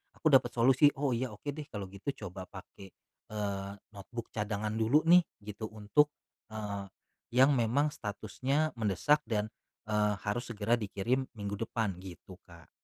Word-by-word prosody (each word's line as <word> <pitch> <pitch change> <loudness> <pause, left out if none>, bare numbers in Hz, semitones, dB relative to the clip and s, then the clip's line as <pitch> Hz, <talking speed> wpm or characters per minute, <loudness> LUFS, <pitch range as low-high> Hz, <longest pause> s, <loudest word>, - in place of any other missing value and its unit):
aku 155 - +2
dapat 135 - +5
solusi, 130 +4 +6
"Oh 140 -1 +1
iya. 125 +2 -1
Oke 145 +8 -4
deh 150 0 -7
kalau 105 -9 -5
gitu 100 0 -13 0.2
coba 90 +1 -8
pakai, 95 0 -11 0.4
eee, 100 -2 -3 0.2
notebook 110 +3 -8
cadangan 105 0 -2
dulu 115 +7 +3
nih." 175 +2 +8 0.2
Gitu 105 +1 -5
untuk, 110 +8 +2 0.4
eee, 100 -2 -4 0.5
yang 130 +3 +7
memang 135 +6 +2
statusnya 130 +9 -1
mendesak 110 +8 +3
dan, 110 -2 -1 0.4
eee, 105 -1 +2
harus 105 +4 -2
segera 110 0 0
dikirim 115 +6 -1
minggu 100 0 -3
depan, 110 -4 -1
gitu 90 0 -11
Kak. 85 -1 -15
110 Hz, 150 wpm, -32 LUFS, 100-130 Hz, 0.5 s, nih